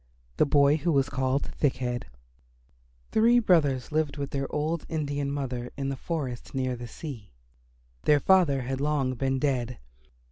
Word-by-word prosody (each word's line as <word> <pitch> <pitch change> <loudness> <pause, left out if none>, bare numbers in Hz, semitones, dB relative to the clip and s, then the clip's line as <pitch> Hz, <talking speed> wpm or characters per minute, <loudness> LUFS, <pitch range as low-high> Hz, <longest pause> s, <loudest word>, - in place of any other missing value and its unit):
THE - - +4
BOY 145 +1 +4
WHO 170 +2 0
WAS 135 -1 +2
CALLED 135 +1 0
THICK 145 -3 +1
HEAD 125 -1 -3 1.1
Three 230 +2 +5
brothers 155 - +2
lived 150 -2 0
with 140 -1 -4
their 135 -1 -3
old 155 +2 -1
Indian 145 -3 -2
mother 125 -4 -4
in 135 -1 -2
the 135 - -2
forest 135 -4 -4
near 130 -1 0
the 120 0 -7
sea. 115 - -9 0.7
Their 150 -1 +5
father 150 -6 +4
had 135 +2 -3
long 145 -3 +1
been 135 +1 0
dead. 125 -3 -1
140 Hz, 155 wpm, -27 LUFS, 130-150 Hz, 1.1 s, Three